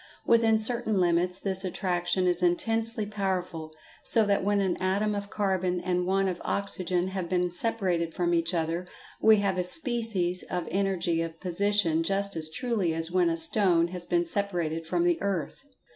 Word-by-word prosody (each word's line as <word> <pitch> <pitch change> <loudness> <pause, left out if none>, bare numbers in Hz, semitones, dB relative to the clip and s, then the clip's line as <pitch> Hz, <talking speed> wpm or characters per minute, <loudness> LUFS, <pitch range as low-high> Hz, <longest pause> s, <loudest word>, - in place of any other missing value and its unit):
Within 230 -1 +4
certain 220 -2 +1
limits, 180 +1 +1
this 190 -1 -3
attraction 180 0 -1
is 180 0 +2
intensely 225 +5 +1
powerful, 185 -6 -3 0.3
so 225 -2 +3
that 200 -1 +1
when 205 +1 +1
an 190 -3 0
atom 200 +3 0
of 200 0 -5
carbon 185 -3 -1
and 180 0 -1
one 195 +1 +1
of 180 -2 -4
oxygen 185 -2 -1
have 190 -3 -4
been 180 -1 0
separated 180 -4 +1
from 175 +1 -1
each 165 0 +1
other, 170 +1 -2 0.3
we 220 -1 +6
have 195 -2 0
a - - +1
species 215 - -1
of 180 -2 -3
energy 185 -3 0
of 165 0 -5
position 185 -2 +1
just 195 +2 -1
as 155 -1 +1
truly 200 -3 -1
as 165 +1 +1
when 180 -2 +2
a 165 - -1
stone 170 0 +2
has 180 -1 -6
been 175 0 +1
separated 170 -4 -1
from 340 - 0
the 345 -1 +1
earth. 185 -7 -3
185 Hz, 175 wpm, -27 LUFS, 175-200 Hz, 0.3 s, we